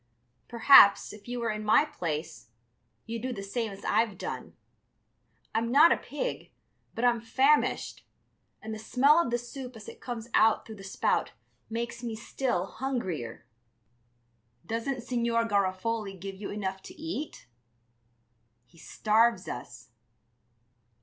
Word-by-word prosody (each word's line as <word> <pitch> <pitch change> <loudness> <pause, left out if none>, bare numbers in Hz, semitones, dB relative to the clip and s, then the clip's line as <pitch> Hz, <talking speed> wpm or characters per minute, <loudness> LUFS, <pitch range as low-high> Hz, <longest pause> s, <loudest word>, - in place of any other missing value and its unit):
Perhaps, 235 -4 +7
if 210 +1 -14
you 245 0 -4
were 230 -2 -1
in 215 0 -4
my 215 +7 +5
place, 150 - -5 0.6
you'd 230 0 -5
do 255 +2 -3
the 200 -5 -5
same 220 +2 -3
as 195 - -11
I've 220 -4 +1
done. - - -6 1.0
I'm 230 +1 0
not 300 +6 +7
a - - +4
pig, - - -5 0.5
but 235 - 0
I'm 240 -2 +3
famished, 270 +6 +1 0.6
and 220 0 -5
the 215 - -6
smell 275 +8 +4
of 340 - +1
the 240 - +1
soup 250 +1 -8
as 215 -2 -11
it - - -11
comes 235 -2 -6
out 220 0 +4
through 220 -1 -10
the 195 - -11
spout 195 - 0 0.4
makes 235 +1 -4
me 230 -2 -4
still 220 -4 -2
hungrier." 190 - -4 1.2
"Doesn't 230 +5 -3
Signor 235 -2 0
Garofoli 200 0 -1
give 195 +2 -6
you 195 +1 -7
enough 190 -2 -4
to - - -13
eat?" 315 -1 -5 1.2
"He 165 +5 -22
starves 220 +2 +2
us...." 120 0 -8
225 Hz, 140 wpm, -29 LUFS, 200-245 Hz, 1.2 s, Perhaps